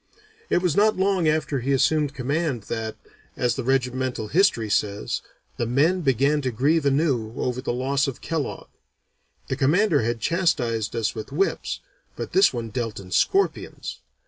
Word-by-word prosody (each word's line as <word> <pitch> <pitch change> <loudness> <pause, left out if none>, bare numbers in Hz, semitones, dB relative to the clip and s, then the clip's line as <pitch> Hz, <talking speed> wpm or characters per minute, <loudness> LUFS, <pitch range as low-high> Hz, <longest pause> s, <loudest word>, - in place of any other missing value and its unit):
It 180 - +2
was 175 -4 +1
not 215 0 +4
long 190 -3 +2
after 155 -2 +1
he 135 +3 0
assumed 145 +1 +2
command 140 -2 -1
that, 110 +1 -4 0.4
as 120 -1 +1
the - - -3
regimental 130 -3 -1
history 155 - +3
says, 100 0 -1 0.4
the 120 - -1
men 155 +9 +2
"began 140 +1 +2
to 130 - -1
grieve 140 +6 +2
anew 135 -6 +1
over 125 0 -2
the 130 - -2
loss 135 +3 0
of 135 - -5
Kellogg. 160 -3 -4 0.8
That - - -1
commander 160 - +3
had 115 +1 -1
chastised 120 - 0
us 115 -1 0
with 110 +2 -7
whips, 180 +8 -1 0.3
but - - -5
this 385 +1 +5
one 115 -1 -4
dealt 115 -3 -3
in 90 -2 -11
scorpions. 390 - 0
135 Hz, 160 wpm, -24 LUFS, 115-160 Hz, 0.8 s, this